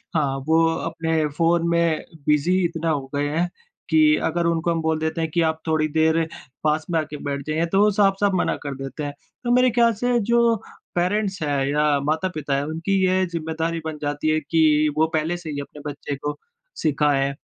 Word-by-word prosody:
हाँ 140 -4 +1
वो 165 +1 +4
अपने 160 -1 -1
फ़ोन 170 0 +2
में 170 -2 +2 0.3
बिज़ी 150 +5 +3
इतना 165 -1 -2
हो 140 -4 -1
गए 145 0 0
हैं 170 +4 0 0.4
कि 310 -1 +5
अगर 170 -1 0
उनको 170 0 +1
हम 165 - -1
बोल 160 0 0
देते 160 +1 -2
हैं 160 - -1
कि 170 - +1
आप 160 -1 0
थोड़ी 155 -1 +2
देर 160 +1 +2 0.4
पास 155 0 +1
में 165 - +2
आके 155 -1 -5
बैठ 140 -1 -3
जाएँ 155 +2 0
तो 195 - +3
वो 210 - +5
साफ-साफ 200 0 +2
मना - - +1
कर 140 -1 -4
देते 135 +3 -6
हैं। 145 0 -4 0.3
तो 240 - 0
मेरे 250 +1 +5
ख़्याल 235 0 +4
से 245 +3 +1
जो 235 +1 +3 0.4
पेरेंट्स 190 +2 0
हैं 140 -2 0
या 150 0 +2
माता-पिता 155 -1 -1
हैं 140 - 0
उनकी 165 +6 -3
यह 185 0 +2
ज़िम्मेदारी 165 0 -2
बन 155 -1 -4
जाती 145 +1 -1
है 155 0 +2
कि 155 -1 +3
वो 160 - +4
पहले 160 +3 0
से 165 -3 -8
ही 145 -1 -4
अपने 145 +1 -11
बच्चे 145 0 -5
को 145 +2 -4 0.5
सिखाएँ। 140 -2 +2
160 Hz, 200 wpm, -23 LUFS, 150-175 Hz, 0.5 s, कि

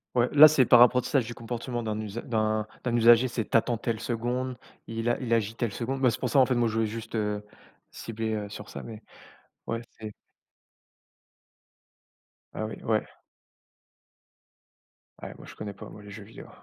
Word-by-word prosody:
Ouais, 120 0 +3
là, 150 +1 +10
c'est 145 -4 +3
par 120 +1 +7
apprentissage 125 0 +4
du 120 - -7
comportement 120 +1 -5
d'un 110 -1 -3
usa 110 +2 -5
d'un 110 -2 -1 0.2
d'un 120 -1 -1
usager. 120 +1 +6
C'est 115 -3 -3
tu - - -4
attends 115 +1 +2
telle 115 0 -3
seconde, 120 +2 -3 0.3
il 115 +1 -4
a 120 - +1
il 120 - -4
agit 110 0 -1
telle 115 -3 -2
seconde. 130 +5 -4
Ben, 130 - +5
c'est - - -3
pour 125 - -2
ça, 140 - +4
en 130 - +5
fait, 130 - +1
moi, 120 -1 +2
je 110 - -3
voulais 115 -1 +1
juste, 115 +1 -7
heu, 105 -2 -2 0.5
cibler, 110 -1 -4
heu, 105 -1 -4
sur 105 0 -9
ça - - -7
mais 110 -1 -10 0.6
ouais, 115 0 -2 0.2
c'est 105 -1 -7 2.4
Ah 110 - -3
oui, 110 - -7
ouais. 110 -1 +1 2.2
Ouais, - - -7
moi, - - -13
je - - -12
connais 105 -1 -6
pas, - - -11
moi, 105 - -12
les 105 - -11
jeux 105 +1 -9
vidéos. 110 +3 -13
115 Hz, 190 wpm, -27 LUFS, 110-120 Hz, 2.4 s, là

